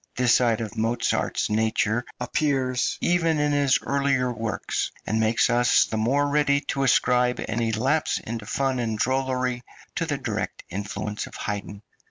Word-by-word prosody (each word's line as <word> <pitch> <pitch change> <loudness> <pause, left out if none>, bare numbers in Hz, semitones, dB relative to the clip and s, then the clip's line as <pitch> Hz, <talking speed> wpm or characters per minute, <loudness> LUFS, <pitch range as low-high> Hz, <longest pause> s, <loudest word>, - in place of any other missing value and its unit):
This 125 -1 +4
side 115 -3 +1
of 110 - -5
Mozart's 115 +2 0
nature 110 +1 +1 0.2
appears 130 0 0
even 170 -2 +2
in 150 0 +1
his 140 -2 +3
earlier 135 -3 +1
works, 115 -1 -3
and 110 +2 0
makes 110 +1 +3
us 120 0 +4
the - - -5
more 135 +7 +1
ready 145 -1 +2
to 135 - -1
ascribe 125 -1 +3
any 115 0 -1
lapse 135 +8 +1
into 110 -2 -6
fun 135 0 0
and 110 -2 -1
drollery 130 0 0 0.4
to - - -1
the - - -1
direct - - -4
influence 105 +2 -4
of - - -12
Haydn. 105 0 -5
125 Hz, 155 wpm, -25 LUFS, 110-135 Hz, 0.4 s, This